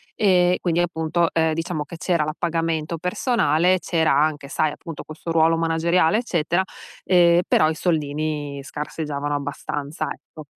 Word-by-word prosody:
Ehm, 180 -3 +3
quindi 175 -1 +1
appunto, 170 0 0
ehm, 160 -1 +2
diciamo 165 -2 -3
che 170 - -9
c'era 170 -3 0
l'appagamento 165 0 -2
personale, 180 - +1
c'era 165 -3 +1
anche, 145 -1 +1
sai, 155 -2 0
appunto, 165 0 -8
questo 155 +2 -7
ruolo 165 0 +4
manageriale, 165 +3 +2
eccetera, 175 -6 0 0.4
ehm, 175 -2 +5
però 155 - +4
i 160 - -2
soldini 150 -3 -2
scarseggiavano 145 0 -4
abbastanza, 145 +1 -4
ecco. 155 - -10
160 Hz, 135 wpm, -22 LUFS, 150-175 Hz, 0.4 s, ehm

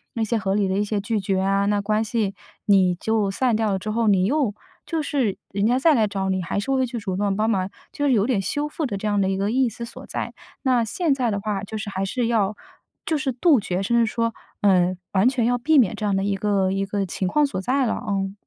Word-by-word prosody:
那 230 - 0
些 225 +1 0
合 195 -1 -1
理 205 -1 +2
的 190 - -1
一 205 - +1
些 210 0 -1
拒 210 +2 -1
绝 195 -1 0
啊， 195 +1 +1
那 205 0 +2
关 215 +2 +1
系 215 -3 -1 0.3
你 190 -3 +4
就 215 +2 0
散 235 +4 +1
掉 220 -1 +1
了 195 - +1
之 210 +3 -4
后， 230 +1 +1
你 190 -3 +4
又 255 -3 +1 0.3
就 325 -2 -1
是 255 -9 0
人 200 +2 +1
家 245 +2 +3
再 310 +4 +4
来 225 -6 +3
找 195 -1 -2
你， 190 0 0
还 180 - -2
是 240 +7 -3
会 265 -1 +2
去 240 - -5
主 200 -4 -3
动 200 0 0
帮 215 +1 +1
忙， 190 -4 0 0.2
就 290 - -2
是 280 - +3
有 215 -5 +3
点 235 -5 +1
修 290 +9 -2
复 300 0 -3
的 200 - -3
这 215 - -3
样 205 -1 +1
的 190 - +1
一 190 - -1
个 200 +2 0
意 255 0 +2
思 235 +2 -7
所 230 - -11
在， - - -4 0.3
那 255 -4 +3
现 295 - 0
在 255 -3 0
的 200 -2 -1
话 200 -1 -2
就 215 +2 -6
是 210 -1 -5
还 190 0 -2
是 240 +5 -1
要 215 -3 +1 0.5
就 320 - 0
是 275 -2 -1
杜 280 +2 +4
绝， 185 -2 -2
甚 235 +4 +1
至 235 - +5
说， 230 -1 -1 0.3
呃， 185 -2 +3 0.2
完 200 +5 +4
全 245 -3 0
要 245 +1 +1
避 305 +5 +3
免 230 -9 +4
这 - - -7
样 205 -2 +1
的 195 - 0
一 200 0 0
个 195 -1 +1
一 195 0 -1
个 200 0 -1
情 190 +1 -3
况 295 +10 +3
所 275 -9 -3
在 260 +5 +1
了 230 - 0
啊。 195 -3 -2
210 Hz, 290 characters per minute, -23 LUFS, 195-240 Hz, 0.5 s, 至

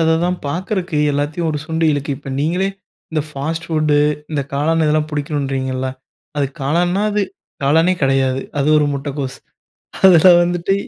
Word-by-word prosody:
அததான் 165 +2 +2
பார்க்கறதுக்கு 180 +1 -2 0.2
எல்லாத்தையும் 150 +4 -1
ஒரு 150 - -2
சுண்டி 160 0 0
இழுக்குது. 145 0 -2
இப்போ, 135 0 -9
நீங்களே 175 +6 +1 0.5
இந்த 155 - +1
ஃபாஸ்ட் 155 +3 -4
ஃபுட்டு 155 -2 +1 0.3
இந்த 145 -2 -1
காளான் 160 +3 +1
இதெல்லாம் 150 0 +2
பிடிக்கணுன்றீங்கல்ல. 135 -3 -2 0.5
அது 140 -1 +1
காளான்னா, 175 +7 +1
அது 210 0 +1 0.4
காளானே 165 +6 +3
கிடையாது. 135 -1 +2 0.2
அது 140 +2 +1
ஒரு 150 - +2
முட்டக்கோஸ். 140 -1 -4 0.7
அதில 185 -2 +8
வந்துட்டு 175 +2 0
155 Hz, 140 wpm, -18 LUFS, 140-170 Hz, 0.7 s, அதில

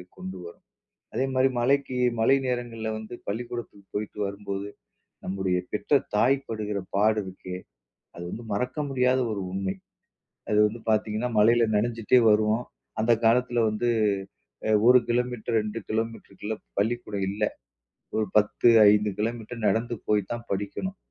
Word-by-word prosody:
கொண்டு 95 0 -7
வரும். 85 0 -12 0.5
அதேமாரி 130 0 +2
மழைக்கு 130 +1 +1 0.2
மழை 115 +5 +5
நேரங்கள்ல 120 -3 -3
வந்து 110 +2 -8
பள்ளிக்கூடத்துக்கு 115 -2 -5
போயிட்டு 105 0 -4
வரும்போது, 100 0 -4 0.6
நம்முடைய 95 -1 0
பெற்ற 140 +7 +2 0.2
தாய் 125 +6 +4
படுகிற 105 -2 -3 0.2
பாடு 105 +2 +3
இருக்கே! 95 -1 -7 0.6
அது 85 - -8
வந்து 115 - -7
மறக்க 125 +7 -2
முடியாத 130 -1 +2
ஒரு 100 -2 -3
உண்மை. 95 0 -2 0.8
அது 105 - +3
வந்து 110 +3 -5
பார்த்தீங்கன்னா, 110 +2 0
மழையில 115 +2 +5
நனைஞ்சிட்டே 115 +2 +3
வருவோம். 110 +3 +2 0.4
அந்த 115 +2 +3
காலத்தில 120 +1 +3
வந்து 110 +3 -1 0.8
அ - - +3 0.2
1 125 0 +9
கிலோமீட்டர், 120 -1 -1
2 105 +2 -4
கிலோமீட்டருக்குள்ள 110 -1 -3 0.2
பள்ளிக்கூடம் 105 -2 -1
இல்ல. 105 +2 -3 0.7
ஒரு 110 - +1
10, 105 +3 +3 0.2
5 105 0 +3
கிலோமீட்டர் 115 +2 -3
நடந்து 115 +4 0
போய் 105 -1 +3
தான் 115 0 -4
படிக்கணும். 105 - -3
110 Hz, 130 wpm, -26 LUFS, 105-120 Hz, 0.8 s, 1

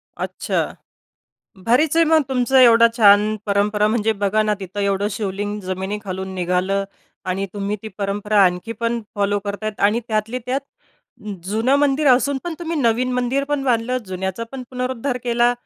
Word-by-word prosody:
अच्छा - - -3 1.1
भारीच 285 +7 +3
आहे 330 - +6
मग. 320 0 +4
तुमचा 260 0 +3
एवढा 230 -1 +7
छान 210 -1 +5
परंपरा 205 +1 +1
म्हणजे 220 0 +1
बघा 210 +2 +2
ना, 215 -1 +1
तिथं 190 +2 -5
एवढं 200 0 0
शिवलिंग 205 0 -3
जमिनीखालून 190 0 -5
निघालं 185 +2 0 0.4
आणि 190 +2 -1
तुम्ही 205 +1 -2
ती 220 - -6
परंपरा 205 +1 +1
आणखी 180 +5 -1
पण 235 0 0
फॉलो 205 0 +1
करतायेत. 205 +1 -4
आणि 210 +4 +3
त्यातली 220 +2 -1
त्यात 265 +2 0 0.8
जुनं 225 +7 +1
मंदिर 290 +1 +2
असून 265 +2 +3
पण 345 -2 -3
तुम्ही 335 -1 -3
नवीन 250 +1 +1
मंदिरपण 275 +3 -1
बांधलं. 250 0 +1
जुन्याचा 190 +3 -4
पण 265 -1 -6
पुनरुद्धार 255 0 -3
केला. 240 0 +3
215 Hz, 150 wpm, -20 LUFS, 200-250 Hz, 1.1 s, एवढा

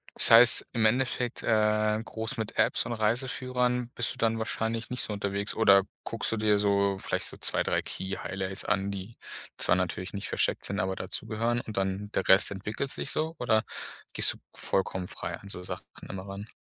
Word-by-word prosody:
das - - +9
heißt 115 +1 +8
im 115 -3 +2
Endeffekt, 125 +1 0
äh, 110 -1 +1
groß 110 +2 -5
mit 110 -1 -5
Apps - - +3
und 120 - -3
Reiseführern 125 +2 -1
bist 120 - +1
du - - -15
dann 115 0 0
wahrscheinlich 110 +1 -3
nicht 125 - -2
so - - -3
unterwegs 100 0 -3
oder 100 -3 +5 0.2
guckst 115 - +1
du 115 - -1
dir 105 -1 +2
so 100 -1 +1
vielleicht - - -1
so - - -3
2, - - +1
3 - - 0
Key-Highlights 95 0 -4
an, 100 0 -1
die 100 +3 -8 0.4
zwar 85 - +2
natürlich 90 +1 -3
nicht 100 0 -5
versteckt - - 0
sind, 100 +1 -2
aber 95 -2 -1
dazu 95 0 -2
gehören. 115 +2 -1
Und 110 - -9
dann 95 +1 -2
der 95 - -1
Rest 95 +1 +5
entwickelt 105 +7 -4
sich - - -2
so 160 +1 -2
oder 110 -3 +2 0.5
gehst - - +7
du - - -15 0.2
vollkommen 95 -1 -1
frei 85 -1 -6
an 100 - -14
so 90 - -5
Sachen - - -7 0.3
immer 95 +1 -7
ran? 100 +2 -8
105 Hz, 195 wpm, -28 LUFS, 95-115 Hz, 0.5 s, das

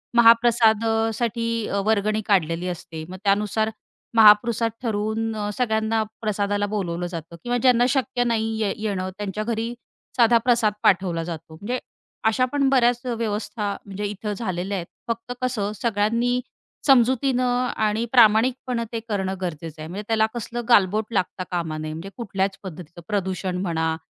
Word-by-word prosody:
महाप्रसाद 230 -1 +5
अ, 225 0 +2
साठी 230 -1 -1
अ, 200 - -1
वर्गणी 215 0 +1
काढलेली 175 -3 +1
असते. 165 -2 -6
मग 185 - -7
त्यानुसार 210 +2 +1 0.5
महापृसाद 225 +1 +6
ठरवून 220 0 -1
अ, 210 -1 -2
सगळ्यांना 220 -2 +1 0.2
प्रसादाला 205 -1 0
बोलावलं 175 -4 -2
जातं 170 -1 -7
किंवा 245 0 0
ज्यांना 245 0 +4
शक्य 260 -2 0
नाहीये 220 -3 0
येणं 200 -4 -2
त्यांच्या 205 0 -3
घरी 230 +1 -2 0.4
साधा 235 -1 +6
प्रसाद 235 -4 +3
पाठवला 180 -3 +2
जातो. 165 -1 -7
म्हणजे 235 +9 -3 0.5
अशा 240 +3 +3
पण 280 -1 +2
बऱ्याच 245 -2 +3
अ, 245 - -1
व्यवस्था 210 -2 -2
म्हणजे 200 +1 -5
इथं 210 +1 -4
झालेल्या 195 -2 -2
आहेत. 170 -2 -5 0.2
फक्त 230 +1 -3
कसं 230 -5 -1
सगळ्यांनी 230 +3 +1 0.5
समजुतीनं 255 -1 +3
आणि 215 +1 0
प्रामाणिकपणे 240 +1 +4
ते 230 - -2
करणं 190 -2 -1
गरजेचं 165 -3 -5
आहे. 155 - -6
म्हणजे 195 +4 -5
त्याला 220 -1 +3
कसलं 240 0 -4
गालबोट 215 0 +3
लागता 185 -1 -1
कामा 165 -3 -2
नये. 155 0 -4
म्हणजे 165 +5 -7
कुठल्याच 195 -4 -2
पद्धतीचं. 175 -2 -9
प्रदूषण 190 -3 -2
म्हणा 160 -3 0
215 Hz, 145 wpm, -23 LUFS, 190-235 Hz, 0.5 s, महापृसाद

